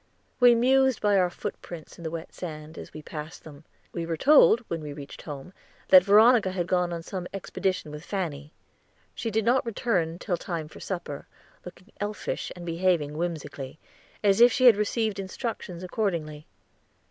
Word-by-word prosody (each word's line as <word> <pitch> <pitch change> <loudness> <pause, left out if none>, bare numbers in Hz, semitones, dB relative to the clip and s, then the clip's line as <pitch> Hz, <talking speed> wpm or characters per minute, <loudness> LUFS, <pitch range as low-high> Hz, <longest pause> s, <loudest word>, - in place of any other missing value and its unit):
We 245 -1 +7
mused 265 +1 +3
by 205 -1 +2
our 180 -1 +3
footprints 170 -1 -8
in - - -10
the 160 - -3
wet 165 +1 -7
sand, 155 -2 -8
as - - -10
we 155 - -10
passed 155 +1 -8
them. 150 -1 -13 0.3
We 170 - -3
were 165 -1 -2
told 275 - +6
when 170 -8 -5
we 150 -1 -6
reached 140 -1 -10
home 145 +4 -8 0.4
that 185 -1 +9
Veronica 215 +1 +6
had 185 -2 -2
gone 180 0 +1
on 170 -1 -4
some 180 0 -5
expedition 185 -4 -2
with 150 +1 -8
Fanny. 155 -8 -4 0.6
She 230 - -3
did 220 0 0
not 250 +3 +3
return 200 -8 -1
till 180 -1 -2
time 165 -4 -4
for - - -13
supper, 175 -7 -5 0.4
looking 180 +3 -12
elfish, 205 +1 -4
and 175 -1 -9
behaving 165 -3 0
whimsically, 150 -4 -5 0.5
as 200 +1 +4
if 240 +1 +8
she 255 +1 +2
had 240 -4 +9
received 210 0 -1
instructions 190 -2 -5
accordingly. 170 -6 -3
180 Hz, 170 wpm, -27 LUFS, 160-210 Hz, 0.6 s, that